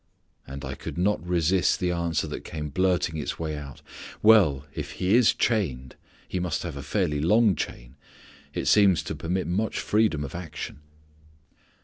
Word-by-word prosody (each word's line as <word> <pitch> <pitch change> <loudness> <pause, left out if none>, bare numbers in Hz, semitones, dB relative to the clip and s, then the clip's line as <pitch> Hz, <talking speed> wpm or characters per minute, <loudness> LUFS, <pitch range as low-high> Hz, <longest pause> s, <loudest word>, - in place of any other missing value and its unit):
And 70 +1 -7
I 65 - -4
could - - -7
not 95 -1 +1
resist 90 +1 +2
the 90 -1 0
answer 85 -2 -1
that 75 - -6
came 75 -2 -5
blurting 90 0 +1
its 75 - -4
way 80 -2 -3
out, 70 -3 -9 0.4
"Well, 90 -11 +5
if - - -5
he 95 +2 0
is 120 -2 +5
chained, 70 - -1 0.3
he 90 - -3
must 90 -3 -2
have 85 -4 -5
a 70 - -5
fairly 75 0 -1
long 105 +5 +4
chain: - - -6 0.5
it - - -3
seems 100 -4 +5
to - - -5
permit 90 +3 -2
much 100 +5 -1
freedom 105 -9 +1
of 70 - -7
action." 85 -4 -7
85 Hz, 165 wpm, -26 LUFS, 75-95 Hz, 0.5 s, Well